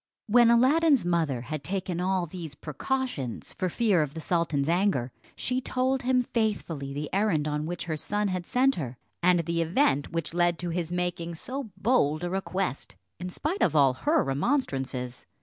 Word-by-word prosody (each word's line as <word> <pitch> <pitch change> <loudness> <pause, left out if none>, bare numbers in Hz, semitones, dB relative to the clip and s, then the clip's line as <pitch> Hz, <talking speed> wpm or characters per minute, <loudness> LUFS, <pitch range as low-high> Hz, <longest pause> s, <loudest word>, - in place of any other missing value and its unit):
When 240 +1 +5
Aladdin's 275 - +4
mother 160 -8 +1
had 145 +3 -5
taken 185 0 -2
all 185 -1 +1
these 165 -4 -8
precautions, 150 - -3
for 185 - -1
fear 205 -3 +2
of 150 -1 -3
the - - -4
sultan's 160 -4 0
anger, 170 -8 +1 0.2
she 255 +1 -1
told 260 +1 0
him 255 0 +2
faithfully 200 - -2
the 145 +2 -4
errand 190 -7 +2
on 150 +1 -2
which 175 +1 -4
her 160 -2 -2
son 205 +7 -1
had 185 -2 -3
sent 265 +2 +2
her, 130 -6 -4 0.2
and 175 0 +4
the 170 +1 -1
event 165 - +2
which 165 -1 -3
led 175 -1 +2
to 175 0 -3
his 170 -1 -2
making 175 -1 -2
so 260 - -5
bold 180 - +2
a 175 - -2
request 190 -4 -2 0.2
in 180 +1 -4
spite 310 - -3
of - - +3
all 140 -3 +5
her 300 - +2
remonstrances. 135 - -1
175 Hz, 175 wpm, -27 LUFS, 150-225 Hz, 0.2 s, When